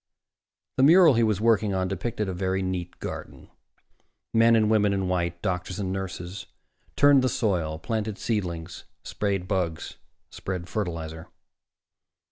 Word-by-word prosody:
The 130 - +4
mural 165 +1 +7
he 115 - +2
was 110 -4 +2
working 110 -3 +2
on 95 0 0
depicted 105 +2 -3
a 95 - -3
very 95 +1 -1
neat 90 -1 -4
garden. - - -8 0.8
Men 115 +1 +5
and 110 -1 +3
women 105 -2 +3
in 95 -1 -1
white, 85 -1 -1
doctors 90 0 -2
and 95 -2 -2
nurses, 95 0 -6 0.5
turned 145 -2 +6
the 130 - +1
soil, 85 -10 -1
planted 110 +2 -3
seedlings, 90 -6 -3 0.2
sprayed 100 -3 -2
bugs, 90 -5 -2 0.3
spread 90 -2 -5
fertilizer. 80 -6 -4
95 Hz, 135 wpm, -26 LUFS, 90-110 Hz, 0.8 s, mural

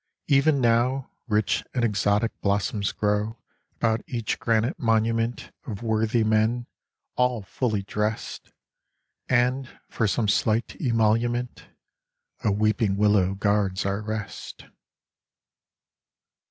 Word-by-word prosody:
" - - -66
Even 140 0 +4
now 125 +2 +1 0.2
Rich 105 -3 +1
and 120 -2 +2
exotic 105 +1 +1
blossoms 100 0 0
grow 105 +2 -1 0.4
About 110 -1 +1
each 115 -3 -2
granite 115 +1 +1
monument 115 0 0 0.2
Of 110 -1 -6
worthy 110 0 +1
men, 110 +3 +1 0.5
all 125 -4 +1
fully 110 0 -2
drest, 105 +2 -3 0.8
And, 130 +1 +1
for 110 - 0
some 105 +2 0
slight 110 +3 +1
emolument, 120 +1 0 0.8
A 105 - +2
weeping 105 -1 +1
willow 100 -2 +3
guards 100 -2 0
our 100 +1 -1
rest. 110 -1 -6
110 Hz, 105 wpm, -25 LUFS, 105-120 Hz, 0.8 s, Even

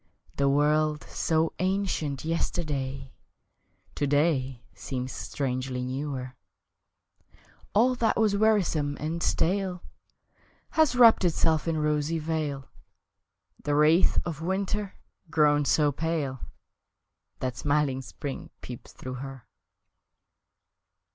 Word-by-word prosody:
The 140 0 +3
world, 150 +2 +2
so 160 0 0
ancient 185 -7 -1
yesterday, 140 -5 -2 0.8
To 145 - -1
day 140 -4 +1
seems 130 -1 -5
strangely 130 -2 -3
newer; 130 -1 -4 1.4
All 245 +5 +5
that 230 -3 +1
was 215 -2 +3
wearisome 185 -9 +2
and 160 +3 -3
stale 185 +1 0 0.9
Has 310 -6 +3
wrapped 235 -4 +7
itself 160 -2 +2
in 165 -1 0
rosy 150 +1 0
veil 150 -4 -3 1.0
The 145 - 0
wraith 155 +4 +4
of 165 -3 -4
winter, 195 +3 -2 0.3
grown 150 -2 +3
so 150 0 +3
pale 150 -3 -2 1.0
That 125 -1 -3
smiling 145 +1 0
spring 135 +2 -7
peeps 125 -2 -9
through 130 0 -7
her! 135 -3 -8
150 Hz, 100 wpm, -27 LUFS, 135-170 Hz, 1.4 s, wrapped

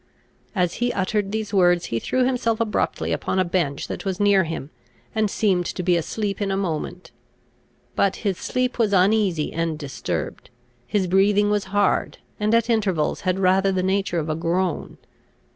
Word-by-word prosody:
As 180 -3 +1
he 245 0 +2
uttered 195 +1 -1
these 215 -1 -3
words, 175 -2 +4
he 115 - +1
threw 255 - +1
himself 235 -3 0
abruptly 225 -2 -1
upon - - -1
a 185 - +3
bench 170 -6 -1
that - - -5
was 190 -1 -3
near 200 -3 +4
him, 160 -2 -5 0.4
and 215 -1 +1
seemed 190 -4 +1
to 180 - -4
be 180 0 +3
asleep 200 +5 -2
in 200 - 0
a 195 - 0
moment. 180 -1 -4 0.8
But 195 - +2
his 195 -3 0
sleep 255 -1 -1
was 215 -3 +2
uneasy 190 -4 +2
and 165 -1 -1
disturbed, 145 -3 -5 0.4
his 200 -3 +1
breathing 200 +3 +3
was 205 -2 0
hard, 200 +1 +1 0.2
and, 215 +2 +2
at 230 0 +2
intervals, 200 -9 0
had 185 -1 0
rather 195 +1 +3
the 185 -1 0
nature 190 -1 0
of 160 -1 -1
a 155 - -1
groan. 170 +1 -1
195 Hz, 175 wpm, -23 LUFS, 175-210 Hz, 0.8 s, words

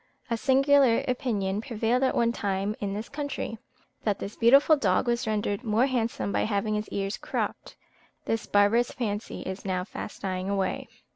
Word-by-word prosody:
A - - +3
singular 270 0 +4
opinion 215 -6 -1
prevailed 230 +1 0
at 265 - +2
one 235 0 +3
time 200 -2 -2
in 200 -1 -3
this 215 +2 -5
country, 285 -6 -4 0.4
that 205 -3 +1
this 200 - -6
beautiful 275 +7 +6
dog 205 -6 +1
was 240 0 0
rendered 210 0 -1
more 225 +2 +2
handsome 235 -6 -1
by - - +1
having 215 0 0
his 210 0 -2
ears 195 0 -2
cropped: - - -4 0.5
this 225 -1 -2
barbarous 205 +4 +3
fancy 215 -3 -4
is 190 +1 -6
now 185 -2 -1
fast 205 +1 -8
dying 185 0 -2
away. 195 -2 -1
215 Hz, 165 wpm, -27 LUFS, 200-245 Hz, 0.5 s, beautiful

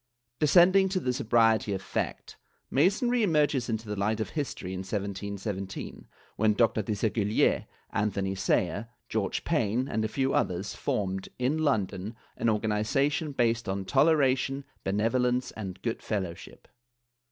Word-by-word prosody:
^ - - -53
Descending 185 +5 +5
to 185 0 0
the 125 -7 -1
sobriety 115 -3 +3
of 95 - -2
fact. - - -4 0.4
Masonry 230 - +3
emerges 150 - +2
into 110 0 -3
the 105 - -3
light 105 +2 0
of 110 - -3
history 135 - -4
in 95 - -4
1717, 100 0 -5 0.3
when 110 -1 +3
Dr. 115 -1 +3
Desaguliers, 105 +1 +1 0.2
Anthony 100 -1 -1
Sayer, 95 +2 0 0.2
George 105 -3 -1
Payne 125 -5 0
and 110 - -1
a - - +1
few 135 +4 0
others 90 +3 0
formed, 95 -1 -2
in 130 +5 0
London, 105 -7 -1 0.2
an - - -1
organiza 110 +6 +1
tion 150 -1 -3
based 115 -4 +1
on 95 0 -2
toleration, 135 - +2 0.2
benevolence 125 +5 +1
and 95 -4 -7
good 115 -1 -2
fellowship. 95 -6 -5
110 Hz, 140 wpm, -28 LUFS, 100-135 Hz, 0.4 s, Descending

